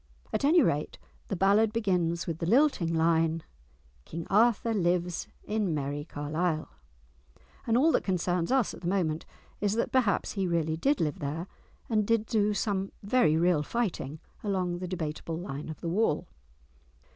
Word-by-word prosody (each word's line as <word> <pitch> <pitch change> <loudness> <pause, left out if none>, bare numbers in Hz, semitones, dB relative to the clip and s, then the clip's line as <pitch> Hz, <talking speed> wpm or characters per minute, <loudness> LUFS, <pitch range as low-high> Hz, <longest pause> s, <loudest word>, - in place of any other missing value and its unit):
At - - 0
any 315 +3 +6
rate 150 -9 -1 0.3
the 195 - -2
ballad 200 +4 +4
begins 180 -6 0
with 165 -1 -4
the 165 - -2
lilting 240 - +3
line:— 165 0 +2 0.6
"King 165 - -6
Arthur 230 +2 +3
lives 175 -3 0 0.2
in 210 -6 -1
merrie 145 0 -3
Carleile," 155 +2 -2 1.0
and 230 0 +3
all 310 +6 +5
that - - +2
concerns 180 -1 0
us 265 -5 +2
at - - -11
the 175 - -4
moment 170 -4 0 0.3
is 205 -1 +1
that 230 - -1
perhaps 235 -7 +2
he 195 -3 -1
really 165 -2 0
did 275 - +1
live 150 -3 -1
there, 150 +4 -3 0.4
and 215 -3 +1
did 230 -1 +2
do 210 -2 +1
some 195 -2 -1
very 200 -7 +3
real 170 -2 +3
fighting 160 - -2 0.2
along 185 -4 -1
the 185 - -4
debateable 165 -2 -4
line 155 -4 -6
of 155 - -8
the - - -4
wall. 175 -2 +1
180 Hz, 160 wpm, -29 LUFS, 160-215 Hz, 1.0 s, any